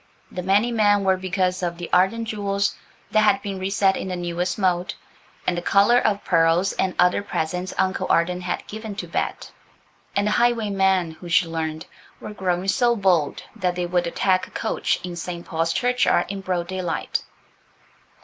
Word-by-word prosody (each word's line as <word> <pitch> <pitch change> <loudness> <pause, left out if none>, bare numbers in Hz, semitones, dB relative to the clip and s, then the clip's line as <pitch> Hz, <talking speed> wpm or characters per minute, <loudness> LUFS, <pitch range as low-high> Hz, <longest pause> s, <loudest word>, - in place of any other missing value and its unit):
The 180 - -4
many 200 +6 +2
men 205 -3 +3
were 190 -1 +3
because 185 0 -1
of 170 -1 -2
the 175 -1 -6
Arden 190 +6 +3
jewels, 200 -2 -1 0.4
that 215 - +4
had 235 +5 +4
been 195 -2 -4
reset 195 0 +2
in - - -4
the 185 - -3
newest 175 0 -2
mode, 180 -3 0 0.5
and 180 - +1
the 175 - -2
collar 200 +7 +4
of 205 -3 0
pearls 165 +2 +3
and 185 -1 -1
other 180 +2 +3
presents 180 -1 -3
Uncle 190 0 0
Arden 180 +2 +2
had 175 0 -3
given 215 -1 -7
to 180 - -5
Bet; 165 - -3 0.6
and 200 - +2
the 210 - +1
highwaymen, 200 -7 +2
who, 170 +2 -11
she 175 +1 +4
learned, 160 -1 -4 0.3
were 210 - -8
growing 185 -2 -1
so 240 +3 +3
bold 180 -8 +1
that 180 -5 -1
they 180 0 -1
would 175 0 0
attack 185 +2 +1
a - - -18
coach - - -1
in 175 -1 -5
St. 170 0 -6
Paul's 165 0 -1
Churchyard 250 +6 +2
in 200 0 -4
broad 180 -2 -2
daylight. 185 -3 -2
185 Hz, 180 wpm, -23 LUFS, 175-200 Hz, 0.6 s, that